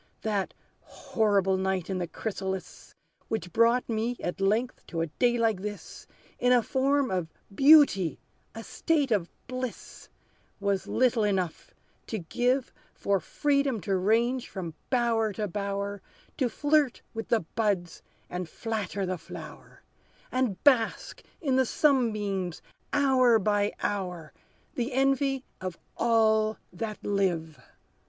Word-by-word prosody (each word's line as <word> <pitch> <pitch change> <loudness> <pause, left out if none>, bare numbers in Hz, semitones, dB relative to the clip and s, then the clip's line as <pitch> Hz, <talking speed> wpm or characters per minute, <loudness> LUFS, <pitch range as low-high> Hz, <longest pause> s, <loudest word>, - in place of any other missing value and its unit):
"That 205 -3 -1 0.3
horrible 200 -3 +1
night 190 -2 -1
in 190 -2 -2
the 175 - -2
chrysalis, 190 -1 -5 0.3
Which 180 -6 -4
brought 235 +2 +3
me 230 +2 -1
at 175 +2 -4
length 220 +6 0
to 165 - -3
a - - +1
day 240 - +1
like 225 -5 +1
this, 205 0 -7 0.3
In 250 - +3
a 245 -2 +5
form 270 +2 +1
of 180 -3 -1 0.3
beauty 275 - +6 0.4
a 225 - -6
state 295 -1 0
of 190 -6 +1 0.2
bliss, 255 -1 -6 0.5
Was 200 -1 -1
little 250 -3 +2
enough 190 -5 -2 0.3
to 220 - -3
give 245 +8 0 0.2
For 200 -1 +1
freedom 280 - 0
to 195 0 0
range 230 +6 +1
from 175 -5 -5 0.2
bower 230 -4 +1
to 210 +2 -2
bower, 200 +1 -3 0.4
To 255 -3 +1
flirt 290 +1 +1
with 225 0 -5
the 230 - +2
buds, 180 -1 -2 0.3
and 180 -2 -5
flatter 205 -2 -3
the 185 -1 -3
flower, - - -11 0.5
And 255 -7 -1
bask 255 -6 +2 0.2
in 270 -5 +1
the 260 - +4
sunbeams 210 - +1 0.3
hour 260 -4 +4
by 205 0 +1
hour, 180 -6 -3 0.4
The 245 +2 -2
envy 270 0 +1 0.2
of 185 -2 -4 0.2
all 220 -2 +3 0.2
that 215 +3 -5
live. 175 -6 0
215 Hz, 130 wpm, -28 LUFS, 190-250 Hz, 0.5 s, beauty